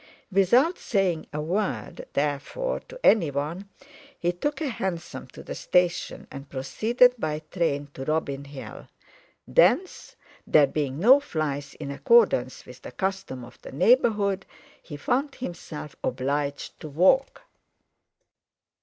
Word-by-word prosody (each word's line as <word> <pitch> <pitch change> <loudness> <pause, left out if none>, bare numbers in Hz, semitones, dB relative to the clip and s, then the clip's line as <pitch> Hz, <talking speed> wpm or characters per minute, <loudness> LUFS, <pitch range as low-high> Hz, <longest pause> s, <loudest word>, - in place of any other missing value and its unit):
Without 240 - +4
saying 190 -7 0
a 150 - -4
word, 185 +7 -3
therefore, 145 - -1
to - - -10
anyone, 165 +1 +2 0.5
he 175 - 0
took 290 +14 -3
a 315 - -1
hansom 190 -9 -4
to - - -12
the - - -6
station 180 -1 0
and 135 0 -9
proceeded 225 - +3
by 155 -3 -2
train 145 -5 0
to 135 - -6
Robin 140 -2 -1
Hill; 140 -1 -9 0.6
thence—there 370 - +2
being 140 -2 -2
no 245 - +7
"flies," 145 - -3
in 140 -2 -6
accordance 140 - +3
with 125 0 -13
the - - -9
custom 190 -5 -3
of 120 - -16
the - - -10
neighbourhood—he 200 - 0
found 270 - -1
himself 165 - -7
obliged 140 +3 -2
to 155 - -8
walk. 190 - +3
165 Hz, 120 wpm, -26 LUFS, 140-215 Hz, 0.6 s, no